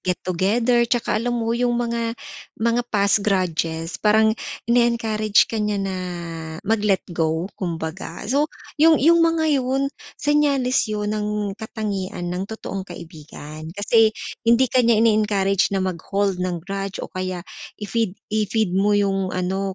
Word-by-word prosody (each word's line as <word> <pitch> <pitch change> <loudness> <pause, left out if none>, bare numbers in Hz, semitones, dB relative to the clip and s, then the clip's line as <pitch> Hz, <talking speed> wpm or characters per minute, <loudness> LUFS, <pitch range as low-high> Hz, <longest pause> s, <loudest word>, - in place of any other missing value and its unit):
get-together. 205 +7 +1
'Tsaka 235 -3 +1
alam 240 +1 -1
mo 230 -1 -1
'yong 240 0 +1
mga 235 -1 -1 0.5
mga 235 +1 +2
past 200 0 +3
grudges 165 -3 -1
parang 220 +1 +4 0.4
ini-encourage 230 -3 +3
ka 225 - -2
niya 210 -1 0
na 190 -1 -3 0.7
mag-let 205 -2 +1
go, 160 0 0
kumbaga. 165 -1 -5
So, 285 +3 +3 0.3
'yong 320 0 +7
'yong 335 +3 +6
mga 320 -3 +3
'yon, 265 +2 0 0.3
senyales 285 -4 +2
'yon 210 0 -2
ng 210 -1 -2
katangian 205 -5 -4
ng 185 +2 -3
totoong 195 -3 -6
kaibigan 155 -2 -10
kasi 220 +1 +3 0.3
hindi 235 +3 +6
ka 255 - +2
niya 235 -2 +4
ini-encourage 205 -3 +2
na 190 - 0
mag-hold 190 +2 -1
ng 175 -3 -2
grudge 195 0 -4
o - - -10
kaya 185 -1 -4 0.3
i-feed 210 -2 -2 0.2
i-feed 215 -2 +1
mo 205 +1 +3
'yong 195 -2 +1
ano, 190 +1 -2
210 Hz, 135 wpm, -22 LUFS, 185-235 Hz, 0.7 s, yong